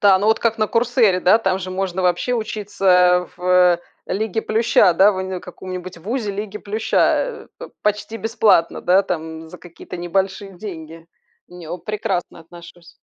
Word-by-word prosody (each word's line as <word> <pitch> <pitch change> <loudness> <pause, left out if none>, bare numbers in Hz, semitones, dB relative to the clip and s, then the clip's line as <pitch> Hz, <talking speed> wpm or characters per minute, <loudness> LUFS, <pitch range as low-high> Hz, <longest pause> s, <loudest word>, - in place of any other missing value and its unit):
Да! 195 -2 +5
Ну 205 - -1
вот 220 - +3
как 225 -1 0
на 215 - +2
"Курсере", 230 -5 +2
да, 185 +5 +5
там 190 -4 0
же 185 -1 -6
можно 190 0 -2
вообще 180 +7 +1
учиться, 210 -3 -4
э, 180 -1 +5
в 180 -1 +3 0.3
"Лиге 220 +2 -2
плюща", 220 -4 +3
да, 200 +4 +5
в - - -6
уни 190 0 -4
в - - -6
каком-нибудь 185 0 -8
ВУЗе 215 +4 -3
"Лиги 205 +1 -5
плюща", 215 +2 -2
э, - - +1
п - - -8
почти 210 +2 -1
бесплатно, 220 -7 +2
да, 185 +2 +3
там 160 -2 -5
за 180 - -12
какие-то 175 +1 -11
небольшие 190 +2 -2
деньги. 165 -4 -9 0.4
Не 175 -2 -11
о 175 +2 -5
прекрасно 195 -2 -4
отношусь. 170 +1 -15
190 Hz, 175 wpm, -20 LUFS, 180-215 Hz, 0.4 s, Да